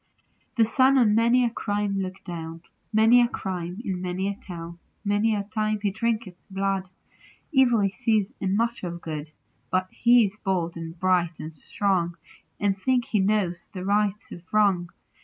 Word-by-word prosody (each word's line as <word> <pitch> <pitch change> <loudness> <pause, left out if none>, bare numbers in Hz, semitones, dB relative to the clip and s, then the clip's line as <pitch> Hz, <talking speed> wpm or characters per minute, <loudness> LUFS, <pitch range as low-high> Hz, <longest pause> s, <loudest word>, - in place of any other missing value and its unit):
The 230 -3 +4
Sun 260 +4 +4
on 225 -5 +4
many 235 +3 +4
a - - +2
crime 205 -3 -1
looks 190 0 -5
down; 165 -2 -7 0.3
Many 225 +3 +6
a 240 - +4
crime 185 -4 -5
in 185 -2 -2
many 185 +1 -2
a 200 - -1
town; 170 -3 -9 0.3
Many 205 +2 +2
a 200 - -1
time 215 +1 -1
he 205 -1 0
drinketh 225 -2 -1 0.2
blood; 195 -1 -1 0.6
Evil 255 -6 +4
he 195 -1 +1
sees, 215 +1 0
and 195 +1 +1
much 235 0 -1
of 170 -1 -4
good; 155 -2 -6 0.4
But 185 0 0
he 240 -1 +5
is 205 +2 -6
bold, 180 -4 -1
and 165 0 -7
bright, 175 -3 +1
and 155 +1 -7
strong, 175 +2 -1 0.4
And 200 -1 +1
thinks 245 +5 0
he 215 - +2
knows 190 -3 0
the 185 -2 -7
right 205 0 +2
of 175 - -8
wrong. 195 -5 +3
195 Hz, 175 wpm, -25 LUFS, 180-220 Hz, 0.6 s, Many